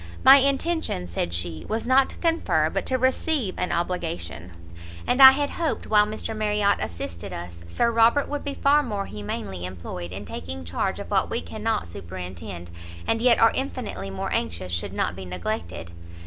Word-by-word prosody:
"My 270 +1 +10
intention," 275 - +1
said 85 0 -2
she, 85 -1 -3
"was 220 +1 -1
not 260 +2 +4
to - - -10
confer, 330 -1 +1
but - - -2
to 260 - +1
receive 260 - +1
an 180 - -1
obligation; 170 - -3 0.5
and 250 +2 +2
I 265 - +14
had 285 +2 0
hoped, 330 -3 -2
while 210 -1 +4
Mr. 220 +1 -4
Marriot 210 -1 +2
assisted 85 0 -5
us, 85 0 -8
Sir 235 - +1
Robert 230 +5 +4
would 290 0 -4
be 280 -1 -4
far 290 +2 +4
more 205 -7 -3
humanely 100 -3 -5
employed 90 -1 -6
in 95 +2 -7
taking 85 0 -6
charge 85 +1 -2
of - - -8
what - - +2
we - - -1
cannot 85 0 -2
superintend, 90 0 -8 0.3
and 225 - 0
yet 245 -1 +5
are 225 - +6
infinitely 245 - -4
more 95 - -3
anxious 85 +3 -2
should 85 - -2
not - - -1
be 95 - -7
neglected." 90 -2 -5
160 Hz, 175 wpm, -25 LUFS, -, 0.5 s, I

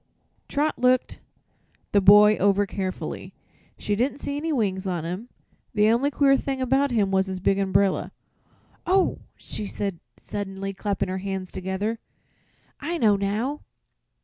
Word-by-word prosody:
'" - - -43
Trot 295 +2 0
looked 250 0 +2 0.7
the 200 - +4
boy 210 +2 +8
over 200 +1 +3
carefully. 190 -1 -5 0.4
She 205 - -1
didn't 255 +6 0
see 285 - -4
any 315 +3 -2
wings 195 -8 -1
on 175 -3 -2
him. 185 +8 -5 0.5
The 210 0 +4
only 250 +5 +2
queer 275 -1 +4
thing 270 0 -2
about 270 +2 +2
him 210 -6 +1
was 190 0 +2
his 190 -1 -4
big 195 +2 +1
umbrella. 195 0 +1 0.8
"Oh!" 375 +1 +2 0.2
she 210 - -5
said 195 -4 -4 0.2
suddenly, 195 -1 -5
clapping 200 -1 -2
her 190 +1 -2
hands 190 -1 -4
together; 190 +5 -3 0.8
"I 335 +4 -3
know 215 -8 +4
now." 215 +9 -2
205 Hz, 150 wpm, -25 LUFS, 195-255 Hz, 0.8 s, boy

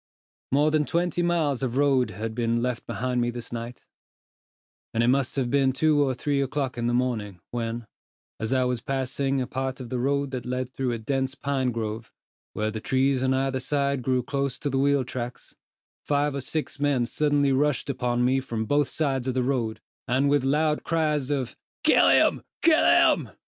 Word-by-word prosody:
More 145 +3 +3
than 155 -1 +2
twenty 175 +1 0
miles 160 -6 +1
of 130 -1 -2
road 140 -3 +3
had 110 +3 -5
been 115 0 0
left 125 -2 -3
behind 125 0 -1
me 120 - +1
this 120 -1 -7
night; 120 +1 -7 1.1
and 115 - +3
it 120 - +3
must 135 0 +1
have 130 -4 -1
been 135 -2 +3
two 150 +2 +2
or 130 -2 0
three 140 +2 0
o'clock 135 -1 -2
in 120 -1 -2
the 120 - +1
morning, 110 -7 -1
when, 115 -1 -3 0.5
as 110 +2 -2
I 130 -1 +3
was 125 -2 -1
passing 135 +1 -1
a - - -1
part 130 +1 -3
of 125 -3 -7
the 125 - -2
road 140 +2 0
that 130 -2 -4
led 125 +1 -3
through 130 -1 -2
a - - -2
dense 135 +3 -2
pine 135 -3 -1
grove, 110 0 -4 0.4
where 110 0 -1
the 110 0 -5
trees 130 +1 +1
on 130 0 +2
either 135 0 0
side 140 0 0
grew 130 0 0
close 140 0 -2
to 145 - -3
the 135 - +1
wheel 140 0 +3
tracks, 125 -1 -7 0.5
five 145 0 +1
or 140 - -3
six 150 +2 -4
men 140 -4 +2
suddenly 145 +1 +1
rushed 145 0 +1
upon 125 -2 0
me 130 +1 +3
from 115 -4 -3
both 145 +4 +2
sides 135 -5 -1
of 130 - -1
the 130 - +1
road, 120 -4 -1 0.3
and 135 +4 +2
with 145 -2 +3
loud 150 +3 +1
cries 150 -4 0
of 135 -4 -2 0.3
"Kill - - +5
him! - - +4 0.2
kill 325 -1 +5
him!" - - +4
130 Hz, 195 wpm, -26 LUFS, 120-140 Hz, 1.1 s, Kill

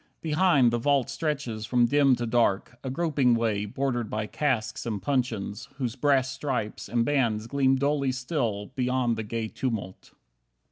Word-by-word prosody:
Behind, 155 -6 +4
the 120 - 0
vault 140 0 +1
Stretches 140 -9 -3
from 120 -1 +3
dim 140 +1 +4
to 120 0 -3
dark, 120 0 +1
a 135 - -3
groping 135 -4 +2
way 110 -3 0
Bordered 120 0 -2
by 110 0 -2
casks 115 -3 -1
and 110 -3 -2
puncheons, 120 -1 -2
whose 125 -3 -3
brass 135 -1 +2
stripes 130 -5 -3
And 120 -1 +1
bands 115 -7 +1
gleam 135 +1 +2
dully 140 0 +1
still, 125 -6 -2
beyond 125 -2 +1
the 110 - -3
gay 110 +1 -3
tumult. 110 -6 -5
125 Hz, 155 wpm, -27 LUFS, 110-140 Hz, -, Behind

